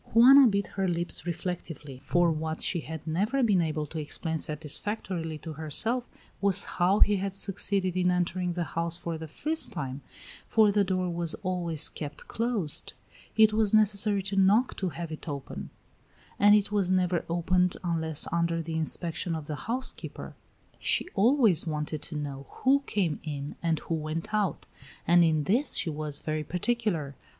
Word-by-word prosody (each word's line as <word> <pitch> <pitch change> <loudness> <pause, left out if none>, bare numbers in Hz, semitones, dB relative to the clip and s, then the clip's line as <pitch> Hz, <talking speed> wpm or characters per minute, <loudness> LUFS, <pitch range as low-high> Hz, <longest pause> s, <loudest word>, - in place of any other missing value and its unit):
Juana 265 +3 +9
bit 200 -2 +1
her 195 -1 +1
lips 175 0 -2
reflectively, 165 -5 -5
for 175 +4 +2
what 160 0 -3
she 175 - 0
had 160 -1 -7
never 205 +12 0
been 200 -6 +4
able 155 -2 -1
to 160 +2 -6
explain 160 +2 -3
satisfactorily 160 +2 -3
to 160 +1 -7
herself 220 - -1 0.3
was 200 -2 +3
how 185 +3 +1
he 205 -1 +5
had 195 0 -3
succeeded 195 -2 0
in 180 -1 +2
entering 180 0 0
the 175 0 -1
house 165 +2 -1
for 170 -1 -4
the 160 - -6
first 310 - -1
time, 140 -7 -5 0.5
for 215 -2 +4
the 205 0 +3
door 185 -1 0
was 170 -1 -1
always 175 -4 -1
kept 145 -1 -7
closed; 225 -9 -2 0.4
it 220 -1 +6
was 215 -1 +3
necessary 205 -1 +3
to 195 +1 -4
knock 200 +6 +4
to 190 - -2
have 170 -1 -6
it 155 +1 -7
opened; 140 -2 -6 0.7
and 205 +1 +7
it 205 0 +1
was 200 -3 +1
never 180 -2 +1
opened 180 +1 +1
unless 160 -3 +1
under 170 0 +1
the 165 0 -4
inspection 165 +1 -2
of 155 -2 -5
the 150 - -4 0.2
housekeeper; 255 +3 -3 0.5
she - - +1
always 215 - +4
wanted 150 -1 -3
to 160 - -4
know 140 -2 -5 0.2
who 270 +2 +5
came 175 -8 0
in 145 -2 -5
and 165 -2 +1
who - - -4
went 160 +4 -3
out, 210 -4 0 0.4
and 175 0 +6
in 155 -2 +2
this 235 - +1
she 165 - 0
was 150 -1 -3
very 155 0 -3
particular. 180 -5 -1
175 Hz, 170 wpm, -28 LUFS, 160-200 Hz, 0.7 s, Juana